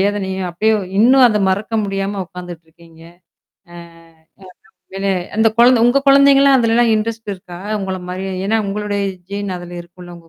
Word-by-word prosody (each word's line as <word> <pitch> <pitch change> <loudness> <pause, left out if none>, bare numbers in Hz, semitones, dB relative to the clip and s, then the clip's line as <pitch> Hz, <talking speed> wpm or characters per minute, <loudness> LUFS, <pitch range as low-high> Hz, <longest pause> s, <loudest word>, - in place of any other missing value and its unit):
வேதனையும் 190 -2 -2
அப்படியே 215 +6 +1 0.3
இன்னும் 255 +3 +6
அத 210 -1 0
மறக்க 210 +4 -3
முடியாம 195 0 -3
உட்காந்துட்டுருக்கீங்க. 170 -2 -13 0.7
ஆ - - -14 1.0
உண்மையிலே 195 0 -4
என்ன 175 - -9
அந்த 225 0 +4
குழந்த 240 -1 +5
உங்க 270 +3 +2
குழந்தைங்கலாம் 275 0 +5
அதுலலாம் 230 0 +2
இன்ட்ரெஸ்ட் 225 -1 -4
இருக்கா? 180 -1 -12 0.2
உங்கள 190 -1 -4
மாரி? 190 +1 -5 0.2
ஏன்னா 225 +2 +1
உங்களுடைய 205 0 -3 0.3
ஜீன் 200 -2 -4
அதுல 175 0 -9
இருக்கும்ல, 175 0 -14
உங்க 165 -1 -21
200 Hz, 145 wpm, -17 LUFS, 180-225 Hz, 1.0 s, இன்னும்